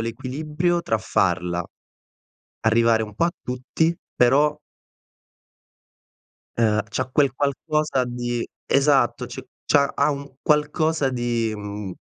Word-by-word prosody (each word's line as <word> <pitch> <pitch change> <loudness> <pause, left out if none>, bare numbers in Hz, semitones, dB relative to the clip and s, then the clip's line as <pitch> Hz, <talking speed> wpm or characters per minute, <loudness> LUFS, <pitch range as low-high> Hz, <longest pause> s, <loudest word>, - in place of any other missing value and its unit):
l'equilibrio 150 +9 -1
tra 110 -9 0
farla 90 -2 0 1.0
arrivare 115 0 +3
un 105 -1 -7
po' 140 - +1
a 175 - +2
tutti, 130 +7 -1 0.2
però 145 +5 +4 2.0
ehm, 110 -2 +3
c'ha 130 +3 -1
quel 140 -3 +3
qualcosa 145 0 0
di 120 -1 -3 0.2
esatto, 135 -4 +3
c 120 - -7 0.3
c'ha 140 -1 +3
ha 150 - +2
un 140 -1 -6
qualcosa 150 0 +2
di, 120 -2 -1
mhmm 105 -2 -6
125 Hz, 110 wpm, -23 LUFS, 115-150 Hz, 2.0 s, però